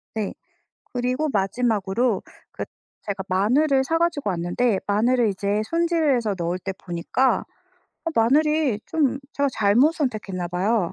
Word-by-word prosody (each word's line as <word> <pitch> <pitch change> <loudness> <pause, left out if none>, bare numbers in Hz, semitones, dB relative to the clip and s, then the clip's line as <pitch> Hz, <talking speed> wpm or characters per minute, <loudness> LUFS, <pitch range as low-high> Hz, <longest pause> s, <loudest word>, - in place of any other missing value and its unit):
네. 215 -2 -2 0.6
그리고 255 +5 0
마지막으로 210 0 0 0.3
그 - - -5 0.4
제가 195 -2 -3
마늘을 265 +9 +3
사 325 +5 0
가지고 310 -10 0
왔는데 185 +5 0
마늘을 230 +3 +3
이제 200 +2 -1
손질을 330 -4 +2
해서 225 -4 0
넣을 170 +1 -1
때 190 +1 -5
보니까 185 +9 0 0.6
아 330 - -1
마늘이 290 0 +3
좀 290 -5 +1
제가 280 0 +1
잘못 230 +9 +4
선택했나 210 - -2
봐요. 185 +1 0
230 Hz, 290 characters per minute, -23 LUFS, 195-280 Hz, 0.6 s, 잘못